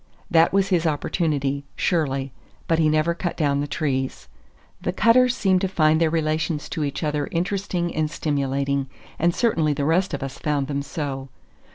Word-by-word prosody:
That 165 -1 +5
was 195 0 +2
his 175 -3 +2
opportunity, 145 -2 -1
surely; 135 -6 0 0.3
but 165 -1 +2
he 155 -1 +4
never 155 +2 +2
cut 170 +1 -4
down 145 -3 +1
the 145 - -2
trees. 135 - -2 0.5
The - - -1
Cutters 245 +3 +4
seemed 190 -5 +2
to 195 - +1
find 160 -3 +3
their 165 - +4
relations 155 -1 -1
to 160 - -2
each 145 +3 -3
other 150 -1 -1
interesting 180 0 -1
and 155 -1 0
stimulating, 140 -3 -1 0.3
and 170 +1 +2
certainly 165 -11 +2
the 140 0 -2
rest 170 +1 +2
of 140 - -6
us 135 0 -6
found 145 -2 0
them 140 0 -2
so. 140 -2 -5
155 Hz, 175 wpm, -23 LUFS, 140-170 Hz, 0.5 s, That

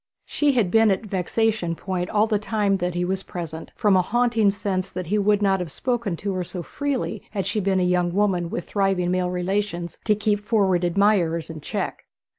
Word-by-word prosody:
She 290 -2 +1
had 220 -8 +1
been 225 -1 +5
at 195 +3 0
vexation 200 -1 0
point 180 0 -3
all 210 0 +3
the 215 -2 0
time 205 -2 +1
that 180 -1 -2
he 175 0 0
was 190 +1 -1
present, 165 -4 -7
from 205 -4 +3
a 185 - +5
haunting 230 +1 +2
sense 195 -2 -2
that 185 0 -5
he 205 +6 0
would 205 0 +2
not 195 -1 +3
have 175 -4 -4
spoken 235 - -2
to 195 +3 -3
her 185 -1 -2
so 175 0 -6
freely 270 -6 -3
had 195 -4 -3
she 205 +3 -1
been 190 -1 +1
a - - +2
young 180 -1 +2
woman 185 -3 +1
with 175 - -4
thriving 195 -3 +1
male 180 0 0
relatives 180 -1 -2
to 215 - +3
keep 210 0 +1
forward 200 -4 +1
admirers 175 -3 +2
in 160 -2 -8
check. - - -4
195 Hz, 210 wpm, -23 LUFS, 180-210 Hz, -, been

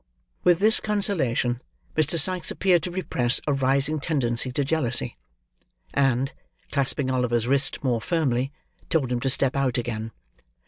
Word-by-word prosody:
With 175 -1 +5
this 215 +4 +5
consolation, 145 - 0 0.3
Mr. 155 +2 +3
Sikes 180 +1 +2
appeared 180 -3 +2
to 180 - -4
repress 130 -9 +1
a 145 - +1
rising 140 +3 +1
tendency 130 -5 -1
to 140 +1 0
jealousy, 150 -5 0 0.8
and, 135 0 +1 0.4
clasping 135 -1 0
Oliver's 120 -2 0
wrist 135 +1 +2
more 120 -4 0
firmly, 135 -4 0 0.4
told 140 -6 0
him 125 - 0
to 135 +2 -1
step 130 +1 +2
out 135 -3 0
again. 115 -2 -3
135 Hz, 140 wpm, -24 LUFS, 125-160 Hz, 0.8 s, With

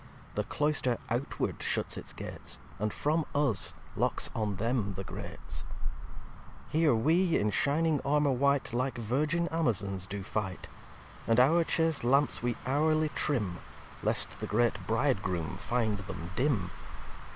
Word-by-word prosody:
The - - -1
Cloyster 145 -5 +1
outward 125 +4 -1
shuts - - -1
its - - -6
Gates, - - -3 0.2
And, 105 +1 0
from 155 +7 +1
us, 140 -7 +1 0.2
locks - - +1
on 105 -3 0
them 110 -2 0
the 95 - -4
Grates. - - -6 0.8
xiv - - -20
"Here 155 -3 +4
we, 165 +9 +3
in 105 0 +1
shining 150 +5 +2
Armour 145 0 +3
white, 140 -1 +2
Like 130 +2 0
Virgin 150 +9 0
Amazons 100 - 0
do 100 -1 -4
fight. 95 -2 -3 0.6
And 115 +1 +4
our 160 +7 +5
chast 160 -3 +1
Lamps 140 +4 +3
we 120 -1 0
hourly 155 +3 +2
trim, 105 -14 -1 0.4
Lest - - 0
the - - -3
great 120 +2 +3
Bridegroom 95 - 0
find 110 -4 0
them 90 -3 -6
dim. 110 -8 +1
125 Hz, 140 wpm, -31 LUFS, 105-150 Hz, 0.8 s, our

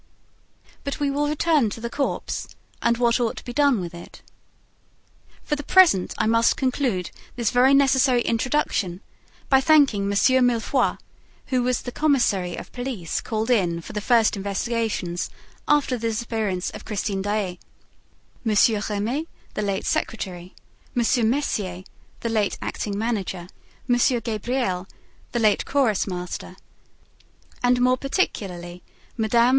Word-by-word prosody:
But 280 - -4
we 285 -1 +1
will 290 +1 0
return 300 -4 +2
to 215 - -7
the 235 - -4
corpse 275 +4 -3 0.3
and 235 0 +2
what 235 0 +2
ought 235 -2 -1
to - - -9
be 245 - -6
done 285 -5 +3
with 175 -2 -5
it. 170 - -12 1.2
For 295 - -1
the 290 - -5
present, 310 - +4
I - - +1
must 230 +1 +3
conclude 255 -8 -1 0.2
this 235 -3 0
very 255 +3 +5
necessary 265 -3 +4
introduction 225 -7 0 0.5
by 265 -1 +5
thanking 275 -9 +4
M. - - -1 0.4
Mifroid 245 +3 +1 0.6
(who 255 - +3
was 250 0 0
the 245 - -5
commissary 240 - +1
of - - -9
police 245 -9 -4
called 220 +2 -2
in 175 -8 +2
for 165 - -10
the 210 - -3
first 230 -1 +3
investigations 200 -2 -2 0.4
after 285 -4 +2
the 230 - -1
disappearance 220 -5 -2
of - - -9
Christine 200 -2 -2
Daae), 200 -3 -2 0.8
M. 220 -3 +1 0.3
Remy, 230 +10 -2 0.3
the - - -2
late 200 -1 -2
secretary, 185 -4 -3 0.4
M. 235 -1 +3
Mercier, 200 -9 -2 0.4
the 230 - -2
late 215 -3 0
acting 200 -1 -4
manager, 200 -5 -2 0.4
M. 245 -1 +3 0.2
Gabriel, 215 -4 -2 0.4
the - - -2
late 215 -2 +3
chorus 255 -10 +1
master, 180 0 -5 1.1
and 245 0 +3
more 255 +1 +3
particularly 180 - -2 0.3
Mme. 235 +1 +3
230 Hz, 140 wpm, -24 LUFS, 200-255 Hz, 1.2 s, very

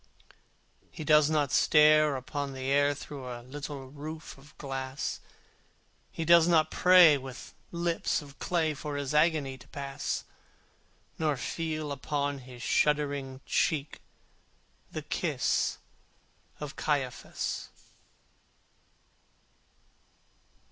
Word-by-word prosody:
He - - -8
does 150 -1 +5
not 150 -3 +1
stare 150 -1 +5
upon 140 +2 -4
the 130 - -7
air 145 +1 +3
Through 140 -2 -8
a 120 -1 -7
little 140 +1 -7
roof 155 +2 -8
of 140 +2 -19
glass: 135 -1 -4 0.9
He 165 - -4
does 170 0 +7
not 160 -3 +3
pray 180 -5 +7
with 130 -1 -9 0.2
lips 170 -1 0
of 140 -2 -13
clay 160 -3 0
For 150 0 -5
his 140 0 -3
agony 150 -4 +2
to - - -16
pass; 140 0 -4 1.0
Nor 150 -3 +1
feel 155 +2 -3
upon 140 0 -2
his 125 -1 -11
shuddering 140 -3 0
cheek 150 -2 0 0.9
The - - -5
kiss - - 0 0.8
of 150 -2 -6
Caiaphas. 135 -5 -2
145 Hz, 105 wpm, -29 LUFS, 135-155 Hz, 1.0 s, does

